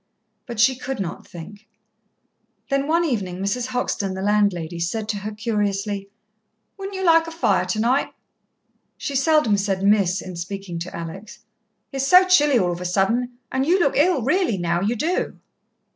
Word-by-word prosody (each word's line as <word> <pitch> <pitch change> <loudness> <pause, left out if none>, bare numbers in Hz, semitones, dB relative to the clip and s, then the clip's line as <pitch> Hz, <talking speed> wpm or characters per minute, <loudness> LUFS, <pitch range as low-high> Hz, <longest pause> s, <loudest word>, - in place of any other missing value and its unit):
But 235 -3 -6
she 260 +3 +5
could 255 +1 -5
not 175 -3 -5
think. 200 +6 -11 1.0
Then 275 +1 +1
one 335 +2 +2
evening 195 - -2
Mrs. 200 +6 -2
Hoxton, 230 -6 -2
the 190 - -4
landlady, 195 -5 +1
said 210 +6 -2
to 210 - -1
her 205 +2 -5
curiously: 205 -2 -2 0.7
"Wouldn't 390 0 -7
you 380 - -2
like 330 -1 +5
a - - -6
fire, 205 - +1
tonight?" 225 +8 +1 0.9
She 285 - -4
seldom 275 -6 +3
said 195 -1 -1
"Miss" 200 -2 +3
in 185 -1 -7
speaking 180 0 -5
to 175 +2 -6
Alex. 180 +7 -8 0.5
"It's 270 0 -1
so 365 +4 +7
chilly, 295 -7 +5
all 180 -5 +1
of 175 0 -5
a - - -5
sudden, 230 +7 0
and 265 0 0
you 350 +7 +3
look 310 -6 +2
ill, 300 -3 +3
really, 300 - +1
now, 175 0 0
you 215 +5 0
do." 325 +10 -1
215 Hz, 170 wpm, -22 LUFS, 190-275 Hz, 1.0 s, so